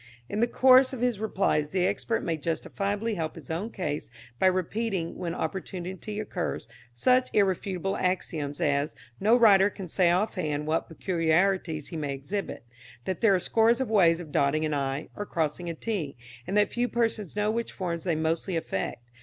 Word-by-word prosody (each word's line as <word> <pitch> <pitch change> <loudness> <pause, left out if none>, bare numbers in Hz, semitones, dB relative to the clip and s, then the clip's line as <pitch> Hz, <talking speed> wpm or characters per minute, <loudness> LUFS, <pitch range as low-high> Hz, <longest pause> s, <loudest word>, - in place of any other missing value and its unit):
In 205 - -3
the 235 - +3
course 260 +2 +6
of 250 - -5
his 245 -4 +1
replies 195 -8 +1
the 180 +2 +1
expert 225 +4 -1
may 165 - 0
justifiably 200 +7 -2
help 160 -5 -3
his 160 -3 -9
own 180 +8 -2
case 155 -9 -4 0.3
by 190 - +5
repeating, 185 0 -1
when 170 -1 -4
opportunity 190 +4 -4
occurs, 195 -4 -3 0.2
such 255 - +3
irrefutable 195 -1 +1
axioms 160 -6 -2
as, 145 +1 +1 0.2
No 220 +5 +5
writer 205 -4 +6
can 195 -2 -8
say 175 +1 +3
off 185 +5 +2
hand 150 -5 -2
what 155 +1 0
peculiarities 165 -1 0
he 165 - -5
may 145 -3 -2
exhibit; 190 +7 -5 0.4
that 185 - -3
there 205 -4 +5
are - - +2
scores 225 +5 +3
of 260 -4 -2
ways 170 -6 +5
of 165 -4 -9
dotting 145 +2 +2
an 155 - -1
i, 140 +1 -2
or 205 - -3
crossing 165 +2 -2
a 165 - -4
t, 165 - -3 0.3
and 200 - 0
that 210 - +3
few 240 +1 +1
persons 225 -6 -1
know 210 +1 +1
which 230 +1 -2
form 175 -3 -3
they 170 -1 -1
mostly 160 +3 -1
affect. 120 -5 -3
185 Hz, 180 wpm, -27 LUFS, 160-210 Hz, 0.4 s, course